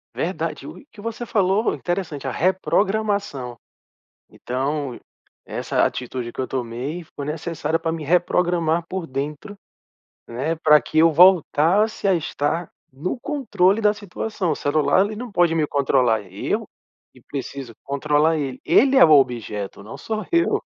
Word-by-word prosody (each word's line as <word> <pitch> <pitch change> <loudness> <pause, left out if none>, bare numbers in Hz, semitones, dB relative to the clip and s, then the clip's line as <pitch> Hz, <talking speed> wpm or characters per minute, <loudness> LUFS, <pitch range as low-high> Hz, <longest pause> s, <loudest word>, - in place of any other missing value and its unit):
Verdade. - - -3
O - - -9
e - - -18
que 205 - -12
você 230 +2 -5
falou 205 0 +1
interessante, 175 -6 -4
a 135 - -1
reprogramação. 190 - 0 0.7
Então, 135 +1 -3 0.5
essa - - -1
atitude 125 -1 -4
que - - -13
eu 130 - -1
tomei 130 +7 -4
foi 140 - -4
necessária 160 +1 -2
pra 165 0 -2
me 160 -2 -5
reprogramar 170 0 +1
por 185 -2 -4
dentro, 150 +9 -5 0.7
né, 135 +8 -2
pra 150 -2 +5
que 155 - -1
eu 165 0 +6
voltasse 185 +5 +4
a 195 - +4
estar 160 +1 -2 0.2
no 170 - -4
controle 230 -8 +1
da 210 -1 +4
situação. 205 -2 -3
O - - 0
celular, 155 +6 +2
ele 210 +1 -5
não 245 +2 -6
pode 175 -4 +3
me 155 -2 +1
controlar, 130 -6 +2
eu 95 - -2 0.5
que - - -19
preciso 135 -3 -6
controlar 150 +3 +1
ele. 135 -3 -4
Ele 275 +1 +4
é 265 - +8
o - - +6
objeto, 110 -8 +1
não 110 - -9
sou 215 +8 -4
eu. 340 0 +2
160 Hz, 150 wpm, -22 LUFS, 140-195 Hz, 0.7 s, é